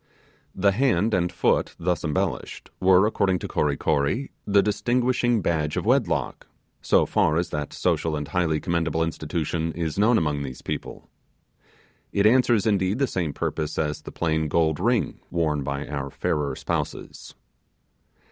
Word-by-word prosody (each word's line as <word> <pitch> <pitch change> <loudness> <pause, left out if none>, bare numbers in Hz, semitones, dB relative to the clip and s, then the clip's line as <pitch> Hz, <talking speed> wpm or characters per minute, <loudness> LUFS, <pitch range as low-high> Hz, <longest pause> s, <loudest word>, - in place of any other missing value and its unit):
The 100 +1 +3
hand 115 -1 +1
and 90 -1 +1
foot - - +1
thus 90 0 -1
embellished 75 -3 -3
were, 95 +1 +5
according 100 -3 +1
to - - -6
Kory 75 -2 0
Kory, 80 - 0 0.2
the 100 -1 +4
distinguishing 120 0 +1
badge 75 -3 0
of - - -2
wedlock, - - 0 0.3
so - - +3
far 80 0 +2
as 85 0 -1
that 75 -1 -3
social 80 -1 0
and 75 -1 -4
highly 85 -4 0
commendable 85 -2 0
institution 80 0 -2
is 85 +1 -3
known 110 +3 +4
among 75 -5 0
those 65 -2 -7
people. - - -6 1.0
It 100 - +1
answers, 120 -2 +4
indeed, 100 -1 +1
the 140 - +2
same 90 - -2
purpose 75 +1 -3
as 75 -1 -1
the - - -9
plain 80 -1 0
gold 80 0 +1
ring - - 0
worn 80 -4 0
by 70 +1 -3
our 70 -1 -4
fairer 70 +1 -2
spouses. - - -5
85 Hz, 150 wpm, -24 LUFS, 75-100 Hz, 1.0 s, were